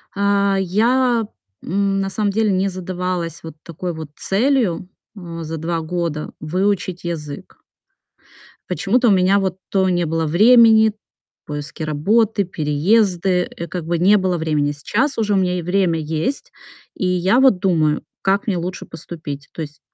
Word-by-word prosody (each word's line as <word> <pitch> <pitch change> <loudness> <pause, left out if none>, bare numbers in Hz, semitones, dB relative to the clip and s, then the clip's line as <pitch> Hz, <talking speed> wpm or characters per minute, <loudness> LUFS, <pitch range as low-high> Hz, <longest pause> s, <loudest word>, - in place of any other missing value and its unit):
А 200 0 +2
я 230 +5 +2 0.4
н 195 +2 0
на 195 - -2
самом 205 +1 -1
деле 215 +1 +1
не 190 +1 +1
задавалась 180 -2 -4
вот 160 -1 -9
такой 175 +2 -5
вот 160 -2 -8
целью, 215 -5 0 0.3
м, 170 -4 -7
за 160 +1 -5
2 165 +1 -2
года 160 -2 -3
выучить 185 +2 -1
язык. 155 -4 -6 1.1
Почему-то 220 +7 +1
у - - +5
меня 190 +1 +4
вот 190 -2 -2
то 190 -1 +2
не 175 -1 +1
было 165 +1 -1
времени, 220 +5 +6 0.5
поиски 150 +2 -6
работы, 200 +8 +1
переезды, 180 +3 +1
э, 170 - -6
как 170 0 -5
бы 170 +1 0
не 195 +5 +5
было 185 -2 0
времени. 150 -3 0
Сейчас 270 - -1
уже 210 -2 +1
у - - +3
меня 180 -1 +1
и - - -3
время 180 -1 +1
есть, 160 - -3 0.4
и 185 - -2
я 185 +6 +2
вот 265 -8 +5
думаю, 160 -5 +1 0.2
как 195 +1 +1
мне 195 -4 0
лучше 180 +2 -5
поступить. 150 -3 -8
То - - -6
есть, 150 -1 -8
180 Hz, 155 wpm, -20 LUFS, 165-200 Hz, 1.1 s, времени